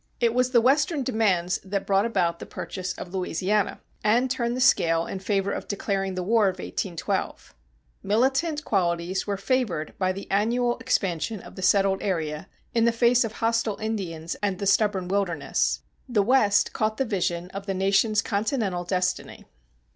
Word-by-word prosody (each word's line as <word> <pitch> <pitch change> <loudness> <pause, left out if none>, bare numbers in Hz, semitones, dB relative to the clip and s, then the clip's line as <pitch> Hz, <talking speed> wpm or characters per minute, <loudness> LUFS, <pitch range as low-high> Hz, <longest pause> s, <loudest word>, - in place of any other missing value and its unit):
It 235 -1 +2
was 250 +1 +2
the 240 -2 +4
Western 285 +4 +2
demands 200 -8 +1
that 195 0 -3
brought 195 +2 +2
about 175 -6 0
the - - -8
purchase 185 -1 -5
of 180 - -9
Louisiana, 190 +2 -1 0.2
and 240 +4 +3
turned 240 0 -1
the - - -3
scale 165 -10 +3
in 195 - -5
favor 195 0 0
of - - -4
declaring 195 -2 -2
the 185 - -2
War 220 +3 +3
of 185 - 0
1812. 175 - -3 0.5
Militant 270 - +1
qualities 175 -1 0
were 200 -1 -1
favored 205 - -1
by 185 -1 +2
the 195 +1 -6
annual 240 +5 +1
expansion 210 -4 -1
of - - -13
the 190 - -7
settled 195 0 +3
area 160 -2 -2 0.2
in 230 -1 +3
the 235 - +4
face 235 +1 +3
of 225 -1 -4
hostile 230 -2 0
Indians 180 -7 -4
and 200 -2 0
the 200 - -4
stubborn 200 -2 +2
wilderness. 180 -6 0 0.3
The 215 -5 +2
West 210 -3 +3
caught 215 0 -1
the 270 - +1
vision 180 -4 -2
of 195 +1 -7
the 195 - -1
nation's 200 +3 +2
continental 200 -4 -1
destiny. 180 0 -2
200 Hz, 170 wpm, -25 LUFS, 185-230 Hz, 0.5 s, the